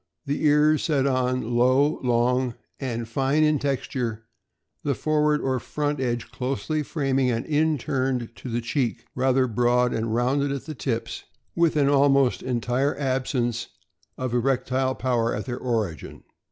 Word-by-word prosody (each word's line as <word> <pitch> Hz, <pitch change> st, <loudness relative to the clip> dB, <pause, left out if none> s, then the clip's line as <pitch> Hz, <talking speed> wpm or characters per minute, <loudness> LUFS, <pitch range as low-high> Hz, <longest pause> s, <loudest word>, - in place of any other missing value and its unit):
The 145 Hz, +2 st, -2 dB
ears 150 Hz, +1 st, +4 dB
set 145 Hz, -5 st, +1 dB
on 130 Hz, -3 st, 0 dB
low, 130 Hz, +5 st, +3 dB
long, 125 Hz, 0 st, +1 dB, 0.2 s
and 120 Hz, -4 st, -3 dB
fine 135 Hz, +6 st, +1 dB
in 150 Hz, -1 st, +3 dB
texture, 125 Hz, -5 st, -2 dB, 0.6 s
the 140 Hz, -2 st, -1 dB
forward 150 Hz, +1 st, +1 dB
or 130 Hz, -1 st, 0 dB
front 145 Hz, +2 st, -2 dB
edge 120 Hz, -2 st, -2 dB
closely 135 Hz, +4 st, -2 dB
framing 135 Hz, -3 st, 0 dB
and 115 Hz, -1 st, -1 dB
inturned 135 Hz, -5 st, 0 dB
to 130 Hz, -, -7 dB
the 120 Hz, +1 st, -1 dB
cheek, 120 Hz, -1 st, -2 dB
rather 130 Hz, 0 st, +2 dB
broad 125 Hz, +1 st, +2 dB
and 110 Hz, 0 st, -2 dB
rounded 135 Hz, +4 st, +1 dB
at 140 Hz, -1 st, -4 dB
the 155 Hz, -, -5 dB
tips, 120 Hz, -4 st, -4 dB, 0.3 s
with 170 Hz, -2 st, +2 dB
an 145 Hz, -2 st, +3 dB
almost 140 Hz, -2 st, +3 dB
entire 125 Hz, +3 st, 0 dB
absence 130 Hz, -3 st, -1 dB, 0.5 s
of 130 Hz, -2 st, -3 dB
erect 125 Hz, +1 st, 0 dB
ile 130 Hz, 0 st, +1 dB
power 120 Hz, -2 st, 0 dB
at 105 Hz, -, -4 dB
their 125 Hz, -1 st, -4 dB
origin. 110 Hz, -9 st, -3 dB
130 Hz, 150 wpm, -25 LUFS, 120-140 Hz, 0.6 s, ears